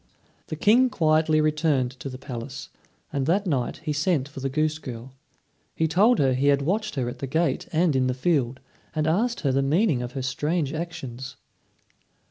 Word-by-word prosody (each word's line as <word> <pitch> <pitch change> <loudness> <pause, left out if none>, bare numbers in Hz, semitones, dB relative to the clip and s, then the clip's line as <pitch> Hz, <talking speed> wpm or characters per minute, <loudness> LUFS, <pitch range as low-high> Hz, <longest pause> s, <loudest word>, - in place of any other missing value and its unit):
The - - -4
King 235 +10 +4
quietly 155 -4 +2
returned 150 -4 +1
to 135 - -5
the 130 - -7
palace, 130 0 -7 0.4
and 140 -2 -1
that 195 +5 +2
night 135 -9 -1
he 150 - -1
sent 150 -2 +1
for 145 -1 -9
the 135 +1 -2
goose 155 +2 0
girl. 125 -2 -8 0.6
He 160 - +1
told 210 +9 +4
her 135 -2 +3
he 135 +3 +1
had 140 -1 +3
watched 210 +6 -1
her 130 -3 -1
at 125 +1 -6
the 135 - -4
gate 160 +5 0
and 165 -2 +2
in 130 -1 +2
the 125 - -1
field, 130 -3 0 0.3
and 155 -1 0
asked 225 +10 +1
her 140 -4 +1
the 135 +1 +2
meaning 150 - +2
of 125 0 -5
her 135 - -4
strange 145 +3 -1
actions. 135 -6 -6
145 Hz, 190 wpm, -25 LUFS, 130-165 Hz, 0.6 s, King